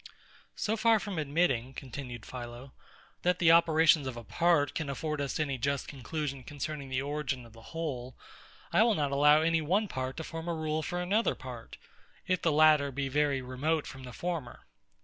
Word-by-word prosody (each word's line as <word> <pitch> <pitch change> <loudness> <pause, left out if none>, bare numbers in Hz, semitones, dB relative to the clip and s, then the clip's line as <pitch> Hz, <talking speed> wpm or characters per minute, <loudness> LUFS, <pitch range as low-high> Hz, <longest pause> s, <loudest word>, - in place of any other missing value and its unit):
So 220 - 0
far 225 0 +4
from 200 -5 -4
admitting, 140 -4 0
continued 125 -3 -7
PHILO, 120 +1 -8 0.5
that 180 0 +2
the 170 -2 +5
operations 160 -3 +5
of 125 -2 -5
a 120 - -7
part 165 0 +2
can 155 -3 -3
afford 150 +2 -3
us 140 +2 -2
any 140 -4 -1
just 140 +2 -1
conclusion 140 0 -4
concerning 145 +1 -5
the 130 +1 -1
origin 140 -3 -3
of 115 - -16
the 115 - -14
whole, 135 -7 -4 0.6
I - - +5
will 225 -1 +4
not 145 -4 0
allow 150 +2 +5
any 165 0 +2
one 195 +8 +1
part 130 -5 -4
to 160 - -4
form 165 +1 -6
a 170 - -1
rule 155 0 -1
for 175 +3 -3
another 200 +6 +1
part, - - -9 0.5
if 185 -2 0
the 165 - +2
latter 150 -2 +5
be 135 +1 -2
very 140 -1 +1
remote 145 +5 -1
from 130 - -9
the 125 -1 -8
former. 165 -5 -5
150 Hz, 190 wpm, -30 LUFS, 130-165 Hz, 0.6 s, the